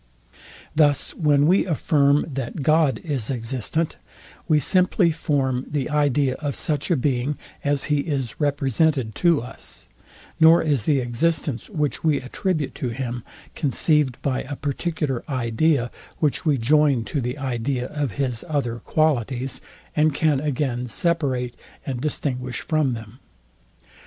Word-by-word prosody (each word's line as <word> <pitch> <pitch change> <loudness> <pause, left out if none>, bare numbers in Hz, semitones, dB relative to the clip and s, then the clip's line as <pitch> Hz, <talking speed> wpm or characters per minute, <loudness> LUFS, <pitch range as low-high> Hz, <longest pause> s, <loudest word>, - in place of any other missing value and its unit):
Thus 145 -2 +3
when 145 -3 +3
we 185 +5 +4
affirm, 145 -3 +2
that 135 +2 -4
God 155 -1 +3
is 140 - -1
existent, 130 - -2 0.5
we 155 -2 +4
simply 180 +3 +3
form 135 -5 -1
the 145 -1 -2
idea 145 -2 +2
of 145 -3 -3
such 150 +1 0
a 175 - +4
being, 135 +1 0 0.3
as 145 -1 +2
he 150 -1 +1
is 140 -6 -3
represented 140 -3 +1
to 170 -7 +2
us; 125 - -6 0.5
nor 165 +1 +7
is 145 -8 +1
the 145 -3 +3
existence, 130 +1 -1
which 150 - -2
we 155 -3 +3
attribute 155 +3 -2
to 125 - 0
him, 120 -1 -4 0.3
conceived 150 -3 +1
by 130 -2 0
a 145 +2 -6
particular 145 -2 -2
idea, 130 +1 +1 0.3
which 150 0 0
we 145 -3 +3
join 140 0 +3
to 140 +4 -3
the 125 +3 -3
idea 130 -1 -2
of 145 -3 -3
his 130 -5 -2
other 120 -6 -1
qualities, 135 -4 0 0.3
and 150 -1 +3
can 150 -3 +2
again 130 -4 -1
separate 130 -3 0 0.3
and 130 -3 -3
distinguish 130 -4 -2
from 150 -6 0
them. 115 +2 -10
140 Hz, 135 wpm, -23 LUFS, 125-155 Hz, 0.5 s, nor